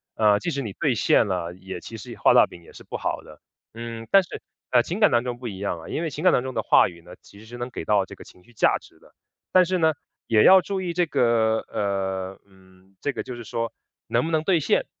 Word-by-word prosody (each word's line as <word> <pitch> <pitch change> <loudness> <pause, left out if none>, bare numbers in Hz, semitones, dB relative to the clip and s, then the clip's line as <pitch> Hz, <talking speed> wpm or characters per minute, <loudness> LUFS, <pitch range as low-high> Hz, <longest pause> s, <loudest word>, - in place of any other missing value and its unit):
呃， 105 -2 +4
即 170 - -3
使 140 - -2
你 110 -6 -5
兑 140 -5 0
现 115 - +3
了， 90 -4 -2
也 95 -1 -8
其 115 - -9
实 105 - -9
画 - - +4
大 - - +7
饼 85 - -14
也 85 - -17
是 - - -13
不 - - -8
好 - - -2
的。 - - -15 0.3
嗯， 115 0 -7
但 195 - +7
是 180 - -8 0.3
感 120 -1 +4
情 175 - -4
感 210 - +6
当 120 0 +2
中 125 -1 -5
不 125 - -6
一 100 -4 -6
样 95 -4 -3
啊， - - -11
因 165 - -3
为 160 - -1
当 150 -3 +2
中 130 -1 -5
的 - - -1
话 - - +5
语 85 -1 -14
呢， 90 +2 -13
其 100 - -17
实 110 - -14
是 120 +2 -9
能 120 +1 -5
给 85 - -6
到 100 0 +2
这 - - -12
个 - - -12
情 90 - -18
绪 120 - -22
价 - - +3
值 - - -20
的， - - -22 0.4
但 185 -1 +6
是 185 +1 0
呢， 160 -2 +3 0.3
也 110 -2 +4
要 190 0 +8
注 195 0 -3
意 180 - -2
这 175 0 +2
个 115 -6 +2
呃， 95 -1 -2
嗯， 95 0 -23
这 145 - -1
个 - - -4
就 125 - -7
是 120 - -8
说 115 +1 -3 0.4
能 - - +1
不 165 - -3
能 155 -1 +1
兑 175 -1 +3
现， 150 - +1
115 Hz, 290 characters per minute, -24 LUFS, 95-155 Hz, 0.4 s, 要